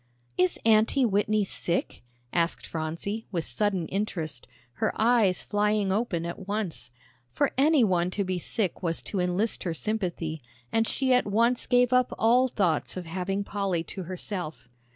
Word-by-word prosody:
"Is 180 +4 +2
Aunty 225 +4 +4
Whitney 210 0 +2
sick?" 175 -2 -1 0.3
asked 170 -1 0
Phronsie, 170 +7 -4
with 170 -4 -2
sudden 180 +6 0
interest, 165 - -3 0.3
her - - +2
eyes 220 -5 +3
flying 210 -1 +1
open 195 -5 -1
at 175 +2 -6
once. 200 - -3 0.4
For - - +1
any 285 0 +4
one 180 -4 +2
to 200 - +2
be 185 -1 -2
sick 195 +2 -2
was 170 -2 -2
to 200 - -3
enlist 180 +5 0
her 170 -3 -2
sympathy, 175 -6 -3 0.3
and 225 0 +2
she 265 -1 +1
at 250 - +3
once 235 +4 +2
gave 250 0 +3
up 250 0 +3
all 245 +3 +4
thoughts 185 - 0
of 180 - -5
having 190 +4 -2
Polly 195 -4 -1
to 190 - -5
herself. 175 - -5
195 Hz, 155 wpm, -27 LUFS, 175-220 Hz, 0.4 s, Aunty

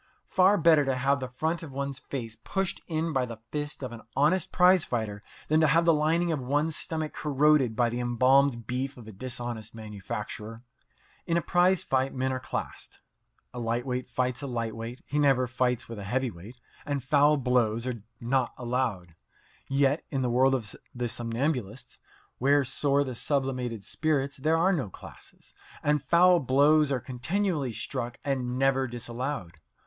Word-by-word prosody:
Far 190 +2 +4
better 160 -3 +5
to 135 -1 0
have 135 +2 +1
the 130 - -4
front 160 +7 -2
of 160 -4 -8
one's 140 0 -4
face 115 -5 -6
pushed 195 -1 -2
in 160 0 -1
by 130 -2 +1
the 115 -2 -7
fist 145 -1 -4
of 130 - -4
an 115 -1 -9
honest 160 +7 +2
prize 180 -1 +5
fighter 110 -4 -3 0.3
than 155 +1 +3
to 155 - +5
have 165 +4 +3
the 165 - +6
lining 165 +3 +2
of 155 - -1
one's 145 +5 0
stomach 160 -3 -3
corroded 145 -4 +2
by 120 +1 +3
the 120 +1 -3
embalmed 125 0 +3
beef 130 +4 -3
of 115 -3 -12
a - - -8
dishonest 120 0 -6
manufacturer. 105 +1 -6 0.6
In 170 -1 +2
a - - +2
prize 180 +1 +3
fight 130 0 0
men 130 0 0
are 130 - -2
classed. 130 - -6 0.5
A 125 - -6
lightweight 120 +2 -2
fights 125 0 -1
with 140 - -4
a - - -6
light 115 -2 -2
weight; 115 +3 -7
he 150 - -1
never 135 -3 +4
fights 125 -1 -1
with 115 -2 -7
a - - -6
heavy 125 +5 -1
weight, 100 +8 -12 0.3
and 140 -3 -3
foul 145 +2 +4
blows 120 -3 +1
are 120 -4 -4 0.2
not 125 +1 0
allowed. 120 -9 -2 0.5
Yet 140 +2 +2
in 135 -3 -1
the 125 - 0
world 130 +2 +4
of 110 -6 -4 0.2
the 120 -1 -2
somnambulists, 120 +1 -3 0.4
where 140 +2 +3
soar 140 +2 +1
the 130 -2 -5
sublimated 125 -4 -2
spirits, 140 0 -1
there 155 +4 +2
are 185 +4 +3
no 135 - -1
classes, - - -14 0.3
and 150 -1 +2
foul 175 +4 +5
blows 145 +2 +4
are 130 - +1
continually 140 - -1
struck 120 +1 -4
and 130 -3 -1
never 135 0 +2
disallowed. 120 - -5
130 Hz, 175 wpm, -28 LUFS, 120-150 Hz, 0.6 s, the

